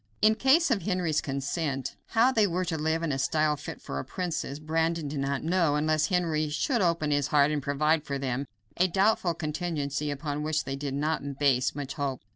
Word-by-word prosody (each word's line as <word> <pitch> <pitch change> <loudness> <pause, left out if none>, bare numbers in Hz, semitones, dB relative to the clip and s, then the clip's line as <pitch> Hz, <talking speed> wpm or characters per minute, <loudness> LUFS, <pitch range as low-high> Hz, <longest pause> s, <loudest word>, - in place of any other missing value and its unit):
In 215 +1 +5
case 270 +7 +3
of 215 -5 +2
Henry's 180 -6 0
consent, 140 -1 -3
how 235 +3 +4
they 220 -5 +3
were 180 +1 -1
to 170 -2 -2
live 160 +1 0
in 165 - 0
a 135 - -1
style 155 +2 +2
fit 140 - -8
for 70 - -5
a - - -3
princess, 170 -6 -3
Brandon 160 +1 -1
did 140 0 -4
not 135 0 -1
know, 165 -3 +2
unless 155 +1 +2
Henry 165 -5 0
should 235 - 0
open 170 -4 +1
his 145 -1 +2
heart 145 0 +4
and 150 -1 -1
provide 150 +3 +1
for 140 -2 -3
them 135 0 -2 0.3
a 185 - +4
doubtful 190 -1 +2
contingency 150 -3 -2
upon 145 +1 -3
which 155 0 0
they 135 0 -4
did 140 -1 -4
not 155 +3 0 0.2
base 135 -3 +2
much 145 -2 -4
hope. 140 -5 -3
155 Hz, 205 wpm, -28 LUFS, 140-170 Hz, 0.3 s, In